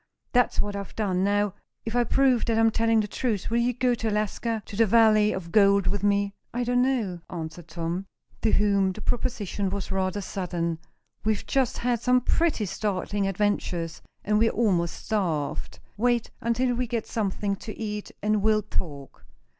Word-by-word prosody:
That's 245 -1 +2
what 205 -1 -1
I've 200 -1 -6
done. 190 -4 0
Now, 205 0 +1 0.3
if 225 +1 -3
I 245 - +4
prove 255 0 +3
that 230 -1 +1
I'm 225 0 +4
telling 225 0 +3
the 210 - -3
truth, 215 -2 -2
will 235 - +3
you 240 +1 +2
go 250 +1 +1
to 225 -1 -1
Alaska 215 +1 -1
to 205 - -9
the 225 +1 +4
valley 215 -1 +5
of 170 -3 -5
gold 200 -1 +5
with 205 - 0
me?" 200 0 +1 0.2
"I 245 +1 -1
don't 245 +1 +2
know," 230 -10 0
answered 165 0 -6
Tom, 170 +3 -4 0.3
to 220 - +2
whom 200 -2 +3
the 215 - -9
proposition 210 -5 -2
was 200 0 -4
rather 190 +1 0
sudden. 175 -4 -3 0.4
"We've 215 -1 0
just 265 -3 +1
had 240 -1 0
some 250 +1 +3
pretty 305 -4 +1
startling 200 0 -1
adventures, 185 -4 -1 0.2
and 210 0 +2
we're 225 +1 +4
almost 180 -9 0
starved. 165 -9 -1 0.2
Wait 240 +1 +1
until 245 +2 +1
we 245 +1 -1
get 230 -1 -2
something 200 -2 -1
to 215 - -8
eat, 210 -2 -4
and 210 0 +2
we'll 215 0 +3
talk. 145 -9 -5
210 Hz, 180 wpm, -26 LUFS, 190-230 Hz, 0.4 s, valley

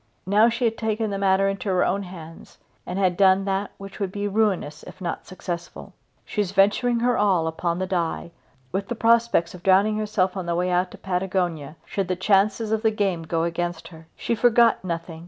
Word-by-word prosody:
Now 210 +4 +4
she 240 +1 -1
had 225 -1 -1
taken 220 -1 -1
the 195 - -3
matter 195 0 +3
into 195 0 -3
her 185 -1 +2
own 200 - 0
hands 165 -4 -11 0.3
and 180 - -4
had 185 -2 +2
done 195 0 +4
that 195 +1 -1
which 195 +1 -10
would 195 -3 -2
be 205 +1 -3
ruinous 195 -8 0
if 185 - -12
not 175 -3 -5
successful. 175 -2 -7 0.3
She 210 - -2
was 195 -2 -3
venturing 210 +5 +3
her 245 +1 +2
all 190 -5 +2
upon 170 +1 -2
the 185 - -1
die, 170 -2 -2 0.4
with 195 +2 -2
the 240 - -3
prospect 230 -6 +2
of 180 - -11
drowning 195 +3 +3
herself 205 -3 0
on 185 -3 -4
the 170 - 0
way 180 +1 0
out 180 +1 +1
to - - -12
Patagonia 180 -5 -2
should 195 -3 -3
the 185 - -1
chances 200 +3 +2
of 220 -1 +1
the 220 - +3
game 200 -5 -1
go 165 0 -1
against 170 0 -3
her. 160 -2 -14
She - - -2
forgot 235 -1 +4
nothing. 170 -2 -5
190 Hz, 210 wpm, -24 LUFS, 175-210 Hz, 0.4 s, Now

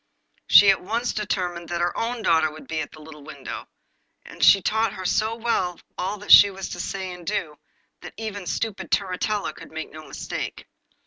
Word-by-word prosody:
She 200 -1 +8
at 195 - -1
once 230 +6 -2
determined 180 -5 -3
that 175 -1 -2
her 175 0 0
own 230 0 -2
daughter 160 -3 +3
should 155 - -12
be 160 -1 -2
at - - -6
the 155 - -13
little 150 -1 -12
window; 140 -2 -8 0.6
and - - -6
she 200 - +8
taught 220 +4 0
her 185 - -7
so 220 +4 +1
well 225 -6 -1 0.2
all 205 +3 -4
she 205 - +10
was 195 -1 -7
to 175 - -7
say 190 0 -4
and 180 -1 -11
do, 170 -5 -3 0.5
that - - -10
even 215 -2 -5
the 180 - -10
stupid 215 +4 -3
Turritella 195 -1 -1
could - - -13
make 160 0 -6
no 155 0 -10
mistake. - - -6
185 Hz, 195 wpm, -24 LUFS, 170-210 Hz, 0.6 s, she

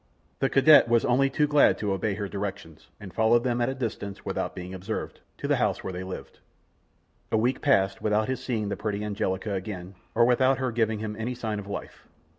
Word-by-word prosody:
The 135 - +2
cadet 140 -1 +7
was 115 -1 +3
only 135 +3 +3
too 150 +2 +2
glad 145 -1 +4
to 105 -2 -1
obey 100 +1 -1
her 100 -1 -3
directions, 95 -5 -6
and 100 -4 -10
followed 115 +1 +3
them 120 -1 0
at 120 - +2
a 135 - -3
distance, 105 -6 -5
without - - -3
being 90 +1 -7
observed, 95 +4 -5 0.2
to - - -4
the - - +2
house - - 0
where 95 - -4
they 90 - -5
lived. 95 0 -8 0.9
A - - +3
week 125 +4 +1
passed 100 -9 +2
without 105 0 +1
his 130 0 -3
seeing 110 -5 -2
the - - -2
pretty 105 -1 -3
Angelica 100 -1 -2
again, 95 -1 -5 0.2
or 120 +1 +5
without 130 +2 +3
her 130 -1 -1
giving 110 -1 +1
him 105 0 -4
any 120 +3 -2
sign 110 -3 -3
of 100 - -9
life. 100 - -7
110 Hz, 215 wpm, -27 LUFS, 100-125 Hz, 0.9 s, cadet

